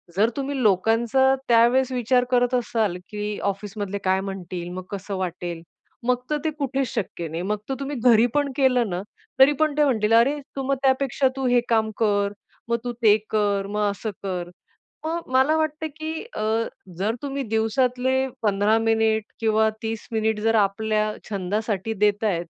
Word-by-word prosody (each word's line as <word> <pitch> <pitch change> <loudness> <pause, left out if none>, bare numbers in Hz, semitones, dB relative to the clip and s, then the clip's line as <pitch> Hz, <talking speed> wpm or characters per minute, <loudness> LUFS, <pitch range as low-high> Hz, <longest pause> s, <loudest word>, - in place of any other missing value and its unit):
जर 215 +4 +3
तुम्ही 275 -1 -2
लोकांचा 230 +6 +3
त्यावेळेस 240 +3 +4
विचार 250 0 +2
करत 245 0 +3
असाल, 220 -6 0
की 210 0 -4
"ऑफिसमधले 200 0 -3
काय 190 0 +2
म्हणतील? 180 -3 -6
मग 185 0 -5
कसं 200 0 -4
वाटेल?" 175 -2 -4 0.5
मग 250 -1 +3
तर 300 - +1
ते 315 - +1
कुठेच 270 -1 -1
शक्य 175 -6 -3
नाही. 165 +2 -4
मग 210 +2 -1
तर - - 0
तुम्ही 280 +1 -4
घरी 235 -2 +6
पण 290 -2 +1
केलं 250 -5 +3
ना, 180 0 -2 0.4
तरी 270 +2 +8
पण 310 -2 +2
ते 300 - +5
म्हणतील, 225 -5 +2
"अरे, 270 +6 +4 0.2
तू 270 - -3
मग 275 - +2
त्यापेक्षा 265 0 +2
तू 270 -1 -2
हे 245 0 +4
काम 220 -1 +2
कर, 205 -2 +1 0.4
मग 235 - +2
तू 245 - -2
ते 215 -1 +7
कर, 205 -2 +1
मग 210 0 0
असं 215 +2 -5
कर." 180 -2 -3 0.6
मग 335 +1 -3
मला 265 +5 +4
वाटतं, 315 0 -1
की 315 0 -4 0.2
अ, - - -3 0.6
जर 210 +4 0
तुम्ही 275 0 -3
दिवसातले 250 +4 +1 0.2
15 210 +1 +3
मिनिट 225 -1 +2 0.2
किंवा 220 0 +3
30 225 0 -4
मिनिट 220 -1 0
जर 225 +1 +2
आपल्या 215 +1 +1 0.2
छंदासाठी 205 +2 -2
देत 205 +1 +2
आहेत, 175 -5 0
220 Hz, 170 wpm, -24 LUFS, 205-260 Hz, 0.6 s, तरी